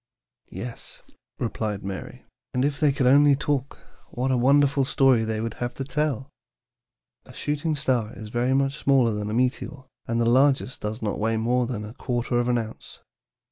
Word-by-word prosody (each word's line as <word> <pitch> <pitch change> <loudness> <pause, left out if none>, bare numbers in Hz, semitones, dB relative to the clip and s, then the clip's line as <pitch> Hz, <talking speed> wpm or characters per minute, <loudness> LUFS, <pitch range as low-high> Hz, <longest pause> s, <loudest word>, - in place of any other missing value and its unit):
"Yes," 120 -1 -8 0.3
replied 110 -4 -3
Mary; 95 -1 -7 0.3
"and 125 +2 +2
if 145 0 -1
they 150 -2 +4
could 135 -1 0
only 140 +2 +6
talk, 140 -1 -2 0.3
what 130 +2 -1
a - - +3
wonderful 140 +2 +4
story 130 -3 +3
they 110 -1 -2
would 115 0 -3
have 120 0 -2
to 135 - -4
tell! 140 -2 -1 1.0
A - - -14
shooting 150 +2 -2
star 125 -6 0
is 110 -1 -8
very 120 +3 +1
much 135 0 +1
smaller 130 -4 +3
than 105 0 -3
a - - -3
meteor, 130 +2 -1 0.2
and 115 0 0
the 115 - +2
largest 130 +1 +2
does 110 +2 -4
not 105 - -2
weigh 110 +1 +1
more 120 +2 +1
than 110 -4 -4
a 105 - -9
quarter 120 0 -1
of 120 - 0
an 125 -1 +2
ounce. 110 -1 -7
125 Hz, 180 wpm, -25 LUFS, 115-140 Hz, 1.0 s, only